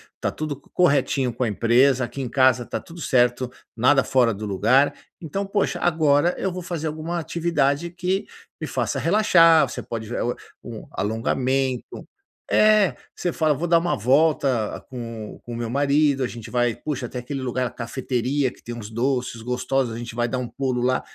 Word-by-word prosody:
está -, -, -2 dB
tudo 155 Hz, -2 st, -4 dB
co -, -, -27 dB
corretinho 140 Hz, -6 st, +2 dB
com 125 Hz, -, -2 dB
a -, -, +1 dB
empresa, 120 Hz, +5 st, +3 dB
aqui 135 Hz, +3 st, -7 dB
em 125 Hz, -, -4 dB
casa 130 Hz, -2 st, +3 dB
está -, -, -4 dB
tudo 170 Hz, 0 st, -12 dB
certo, 125 Hz, -2 st, +2 dB, 0.2 s
nada 130 Hz, +4 st, +4 dB
fora 125 Hz, -3 st, +3 dB
do 105 Hz, +2 st, -6 dB
lugar.". 115 Hz, +8 st, +3 dB, 0.3 s
Então, 185 Hz, +5 st, -3 dB
poxa, 200 Hz, 0 st, -1 dB
agora 160 Hz, 0 st, +2 dB
eu 190 Hz, -, -1 dB
vou 180 Hz, 0 st, -5 dB
fazer 170 Hz, -2 st, -4 dB
alguma 160 Hz, +3 st, -4 dB
atividade 165 Hz, -2 st, 0 dB
que 185 Hz, +3 st, -2 dB, 0.3 s
me -, -, -4 dB
faça -, -, -2 dB
relaxar, 165 Hz, -4 st, +5 dB
você -, -, -6 dB
pode 110 Hz, -2 st, -6 dB
o 120 Hz, 0 st, -1 dB, 0.3 s
um 115 Hz, -3 st, -9 dB
alongamento 125 Hz, +4 st, -1 dB, 0.5 s
é, 210 Hz, -9 st, +4 dB, 0.2 s
você 175 Hz, -, -2 dB
fala: 155 Hz, -2 st, +2 dB
"Vou 155 Hz, +4 st, -3 dB
dar 170 Hz, 0 st, +4 dB
uma 175 Hz, +1 st, 0 dB
volta 130 Hz, -2 st, +1 dB
com 115 Hz, -4 st, -7 dB
com 120 Hz, -, -8 dB
o -, -, -4 dB
meu 115 Hz, -1 st, -3 dB
marido. 140 Hz, +1 st, +2 dB
A 130 Hz, -, +1 dB
gente 115 Hz, -3 st, -9 dB
vai, 120 Hz, -2 st, +1 dB
puxa 130 Hz, +1 st, -4 dB
até 125 Hz, +1 st, -5 dB
aquele 135 Hz, +3 st, -5 dB
lugar, 130 Hz, 0 st, -1 dB
a 120 Hz, -, -2 dB
cafeteria 130 Hz, +2 st, -2 dB
que -, -, -19 dB
tem 120 Hz, -, -7 dB
uns 110 Hz, -3 st, -8 dB
doces 125 Hz, 0 st, -1 dB
gostosos, 125 Hz, 0 st, -1 dB
a -, -, -6 dB
gente 120 Hz, 0 st, -7 dB
vai 120 Hz, 0 st, 0 dB
dar 130 Hz, +2 st, -2 dB
um 125 Hz, -1 st, -4 dB
pulo 125 Hz, 0 st, -2 dB
lá", 130 Hz, +1 st, +1 dB
130 Hz, 190 wpm, -23 LUFS, 120-155 Hz, 0.5 s, relaxar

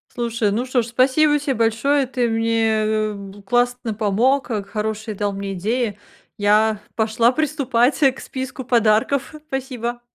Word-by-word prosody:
Слушай, 230 Hz, -3 st, -1 dB
ну 230 Hz, +5 st, -1 dB
что 255 Hz, -1 st, +1 dB
ж, 230 Hz, -, -6 dB
спасибо 275 Hz, +5 st, +3 dB
тебе 285 Hz, -1 st, -1 dB
большое, 240 Hz, +5 st, +1 dB
ты 250 Hz, -2 st, -1 dB
мне 220 Hz, -1 st, +1 dB
бу 200 Hz, 0 st, -10 dB
классно 245 Hz, +1 st, 0 dB
помог, 230 Hz, +7 st, +1 dB
э, 210 Hz, -3 st, -2 dB
к -, -, -21 dB
хорошие 215 Hz, 0 st, -3 dB
дал 205 Hz, 0 st, -2 dB
мне 195 Hz, 0 st, -4 dB
идеи. 210 Hz, +2 st, -2 dB, 0.4 s
Я 210 Hz, +1 st, +3 dB, 0.2 s
пошла 225 Hz, +2 st, +2 dB
приступать 275 Hz, -3 st, +1 dB, 0.2 s
к -, -, -11 dB
списку 260 Hz, 0 st, -6 dB
подарков. 235 Hz, +4 st, +1 dB
Спасибо. 245 Hz, -3 st, -4 dB
230 Hz, 150 wpm, -21 LUFS, 215-255 Hz, 0.4 s, спасибо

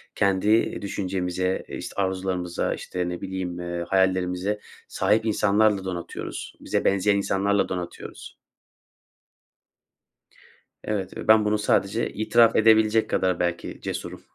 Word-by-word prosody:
kendi 100 Hz, +3 st, +2 dB
düşüncemize, 95 Hz, -2 st, -2 dB
işte, -, -, -7 dB
arzularımıza, 95 Hz, -2 st, -1 dB
işte, 90 Hz, -1 st, -4 dB
ne 90 Hz, -, -5 dB
bileyim, 95 Hz, -2 st, -4 dB
eee, 85 Hz, 0 st, -4 dB
hayallerimize 95 Hz, +1 st, +1 dB, 0.3 s
sahip 110 Hz, +1 st, +1 dB
insanlarla 105 Hz, -2 st, +2 dB
donatıyoruz. 90 Hz, -2 st, -6 dB
Bize -, -, -2 dB
benzeyen 100 Hz, +1 st, +3 dB
insanlarla 100 Hz, +1 st, +1 dB
donatıyoruz. 90 Hz, -1 st, -7 dB, 2.5 s
Evet 100 Hz, -3 st, -3 dB
ve -, -, -7 dB
ben 110 Hz, -1 st, +6 dB
bunu 105 Hz, 0 st, +2 dB
sadece 105 Hz, +1 st, +1 dB
itiraf 115 Hz, +1 st, +4 dB
edebilecek 110 Hz, 0 st, +4 dB
kadar 90 Hz, -2 st, +1 dB
belki 85 Hz, -1 st, -3 dB
cesurum. -, -, -5 dB
95 Hz, 110 wpm, -25 LUFS, 90-105 Hz, 2.5 s, ben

